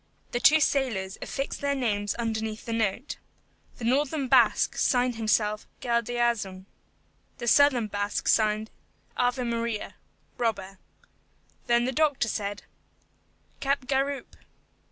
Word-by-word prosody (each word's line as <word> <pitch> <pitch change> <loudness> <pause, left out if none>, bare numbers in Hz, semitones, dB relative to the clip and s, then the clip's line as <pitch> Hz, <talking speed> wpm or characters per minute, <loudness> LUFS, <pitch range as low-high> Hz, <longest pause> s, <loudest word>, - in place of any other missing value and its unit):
The 240 - -1
two 310 +5 +6
sailors 230 -10 0
affixed 275 0 -4
their 280 0 0
names 205 -6 -1
underneath 220 -1 -3
the 230 - -3
note. 225 +4 -1 0.6
The - - -9
northern 275 +3 +1
Basque - - +4
signed 250 -1 +2
himself, 215 -1 0
GALDEAZUN. 235 -5 -1 0.7
The 240 - -6
southern 260 -2 +5
Basque 205 0 -3
signed, 215 0 +2 0.5
AVE 245 0 +1
MARIA: 230 -2 -2 0.5
Robber. 195 -5 -2 0.9
Then 240 0 +3
the 260 - 0
doctor 290 -3 +1
said, 205 -2 -3 1.0
"Capgaroupe." 275 0 -1
235 Hz, 110 wpm, -27 LUFS, 215-260 Hz, 1.0 s, two